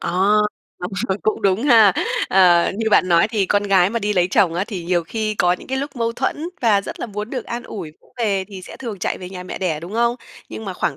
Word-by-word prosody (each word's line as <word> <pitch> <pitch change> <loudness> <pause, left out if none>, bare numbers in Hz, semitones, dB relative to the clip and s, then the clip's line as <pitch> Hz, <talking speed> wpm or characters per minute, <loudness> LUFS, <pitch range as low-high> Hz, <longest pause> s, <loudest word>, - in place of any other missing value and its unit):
À, - - -3 0.7
đúng 180 +2 -5 0.2
rồi, 190 +1 0
cũng 215 - -1
đúng 195 +3 +2
ha. 225 -8 +6 0.4
Ờ, 180 -2 +4
như 220 -1 0
bạn 185 - +4
nói 170 +4 +4
thì 210 -4 0
con 205 0 +2
gái 195 -2 +3
mà 230 - -1
đi 210 -1 -1
lấy 180 -2 +2
chồng 185 -6 +3
á, 185 +3 0
thì 185 -7 -6
nhiều 175 -1 0
khi 215 +3 -2
có 180 -2 +2
những 180 - -6
cái 265 0 -1
lúc 280 -1 -5
mâu 230 0 -1
thuẫn 290 +7 -2
và 215 -4 +3
rất - - -8
là - - -3
muốn 210 +1 -6
được 255 -3 -4
an 235 0 -5
ủi 175 -9 -7
vỗ - - -27
về 200 -4 0
thì 190 -2 -9
sẽ - - -10
thường 225 -7 -6
chạy - - -2
về 180 0 -8
nhà 180 -1 -7
mẹ 185 - -7
đẻ, 165 -5 -1
đúng 175 +5 -9
không? 235 +1 +1 0.3
Nhưng 220 - -7
mà 190 - -4
khoảng 140 -6 -2
200 Hz, 270 wpm, -20 LUFS, 180-225 Hz, 0.7 s, ha